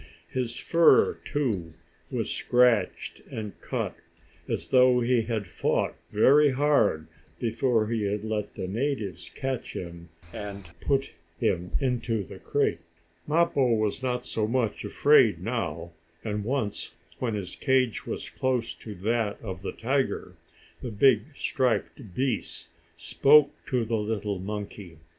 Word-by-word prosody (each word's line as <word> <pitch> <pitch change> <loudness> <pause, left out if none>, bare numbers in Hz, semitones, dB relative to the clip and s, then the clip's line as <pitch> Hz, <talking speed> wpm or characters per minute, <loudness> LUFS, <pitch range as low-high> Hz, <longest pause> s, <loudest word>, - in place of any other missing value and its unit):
His 125 -2 -2
fur, 170 -1 +4
too, 105 - -2 0.3
was - - -2
scratched 120 -6 +2
and 105 -2 -6
cut, - - -3 0.5
as - - -3
though 125 -1 +5
he 120 0 +2
had 110 -2 -2
fought - - 0 0.2
very 145 +7 +6
hard, 130 - +2 0.3
before 115 -1 +1
he 110 -1 -1
had 105 0 -2
let 110 -2 -3
the 95 - -4
natives 105 - -3
catch 135 -2 -3
him 85 -1 -7 0.2
and 100 -2 -7
put 135 +5 0 0.3
him 90 -1 0
into 120 -5 0
the 90 - -11
crate. 85 - 0 0.5
Mappo 150 -6 +3
was 110 +2 -1
not 125 -1 -2
so 110 -1 -1
much 115 -2 0
afraid - - +4
now, 85 +1 -3 0.3
and 105 -1 -2
once, 115 -3 -2 0.3
when 115 -4 -1
his 95 -4 -5
cage 130 -4 +1
was - - -4
close 125 -3 -1
to 105 -2 -9
that 105 +2 -1
of 95 -4 -6
the 100 - -4
tiger, 135 +3 -1 0.5
the 125 - -4
big, 110 0 +4
striped 125 -6 -1
beast 120 -10 -2 0.3
spoke 145 - +5 0.2
to 125 -4 0
the 115 0 0
little 105 -2 -2
monkey. 100 -3 -6
115 Hz, 135 wpm, -27 LUFS, 100-130 Hz, 0.5 s, very